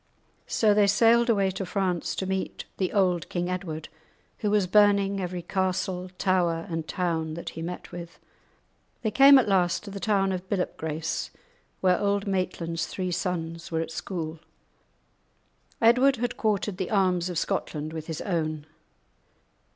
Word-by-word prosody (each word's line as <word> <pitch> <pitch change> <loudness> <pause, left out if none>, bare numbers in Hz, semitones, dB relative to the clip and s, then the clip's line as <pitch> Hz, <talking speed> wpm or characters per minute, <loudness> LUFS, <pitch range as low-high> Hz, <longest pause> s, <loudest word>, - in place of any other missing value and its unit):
So 215 -2 +3
they 205 -1 +4
sailed 230 +3 +4
away 200 -4 +3
to 195 +1 -4
France 185 -2 -1
to 190 - -2
meet 190 0 -3
the 185 -2 0
old 180 -4 +1
King 175 0 -2
Edward, 165 -4 -4 0.5
who 210 - 0
was 205 -2 +3
burning 200 0 +4
every 180 -1 -4
castle, 185 0 -1
tower, 175 -3 +1
and 165 -1 -3
town 165 -3 -1
that 170 - -5
he 165 - -8
met 175 +2 -6
with. 170 -1 -8 0.9
They 220 - 0
came 275 +5 +8
at 260 - +3
last 185 -3 +2
to 205 - -8
the 200 - -6
town 195 -2 +1
of 185 0 -5
Billop 185 -3 -1
Grace, 160 0 -3 0.5
where 180 -1 +3
Auld 200 0 +1
Maitland's 175 -4 -2
three 185 -1 -3
sons 170 -2 -3
were 160 0 0
at 165 - -5
school. 165 -2 -5 1.4
Edward 250 +4 +5
had 245 0 -2
quartered 210 -3 -1
the 185 -2 -3
arms 185 -3 +2
of 175 - -4
Scotland 155 -1 -2
with 160 -1 -6
his 160 -2 -4
own. 155 -5 -2
185 Hz, 160 wpm, -27 LUFS, 170-200 Hz, 1.4 s, came